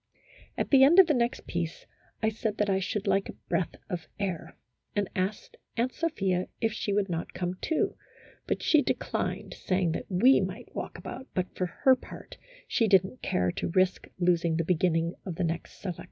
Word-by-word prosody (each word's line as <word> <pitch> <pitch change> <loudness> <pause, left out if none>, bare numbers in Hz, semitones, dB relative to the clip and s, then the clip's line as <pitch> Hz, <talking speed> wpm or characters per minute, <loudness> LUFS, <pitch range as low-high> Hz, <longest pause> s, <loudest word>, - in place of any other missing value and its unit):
At - - -1
the 270 -2 +8
end 305 +6 +7
of 385 - +10
the 315 - +2
next 240 -2 0
piece, 170 -1 -3 0.4
I 220 - +4
said 220 -1 -3
that 205 -1 +1
I 190 - +2
should 195 +2 -2
like 195 0 +1
a - - -5 0.2
breath 180 - 0
of 170 -3 -5
air, 190 -5 -4 0.4
and 205 -2 +1
asked 190 +3 -2 0.2
Aunt 245 +2 +1
Sophia 195 - 0
if 225 -1 +1
she 205 - -2
would 200 0 +2
not 170 -2 -4
come, 180 -1 -1
too, 320 - 0 0.5
but - - -1
she 310 - +5
declined, - - -2
saying 185 -3 0
that - - -4
we 225 +9 +5
might - - -6
walk - - -5
about, 260 +2 -8
but 185 0 -1
for 185 - -1
her 260 +8 +4
part - - -11 0.3
she 230 - +2
did 190 -2 +6
n't 250 +7 -10
care 90 0 +1
to - - -3
risk 185 +2 +2
losing 175 -2 +2
the 165 0 0
beginning 170 -1 +2
of 180 -4 -5
the 180 - -1
next 165 0 -3
selec 180 -4 -3
tion. - - -13
190 Hz, 200 wpm, -29 LUFS, 175-225 Hz, 0.5 s, of